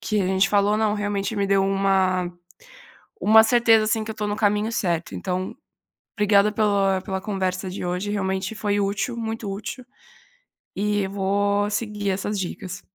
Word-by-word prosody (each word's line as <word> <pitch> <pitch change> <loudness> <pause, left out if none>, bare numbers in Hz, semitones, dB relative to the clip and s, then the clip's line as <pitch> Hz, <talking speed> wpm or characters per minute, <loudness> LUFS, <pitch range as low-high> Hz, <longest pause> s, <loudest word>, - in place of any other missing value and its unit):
que 210 -2 0
a 185 - 0
gente 190 +1 +2
falou, 205 0 +2
não, 215 -1 +1
realmente 205 0 -2
me 200 -1 +1
deu 195 0 +3
uma 190 -2 +1 0.9
uma 220 +1 +7
certeza, 225 -1 +4
assim, 220 0 0
que 220 - -5
eu - - -7
estou 210 -1 -3
no 205 - -1
caminho 210 +1 +1
certo, 170 -6 -1
então 185 0 -3 0.6
obrigada 210 0 +3
pela 200 -3 +2
pela 190 0 -4
conversa 185 -2 -2
de 185 - -6
hoje, 180 +3 -2
realmente 190 0 -2
foi 205 -1 -1
útil, 200 +4 -1
muito 225 -2 -4
útil, 220 +5 -6 0.9
e 205 0 0
vou 200 +1 0
seguir 210 -2 -2
essas 200 +2 -2
dicas. 185 0 -5
200 Hz, 160 wpm, -23 LUFS, 190-210 Hz, 0.9 s, uma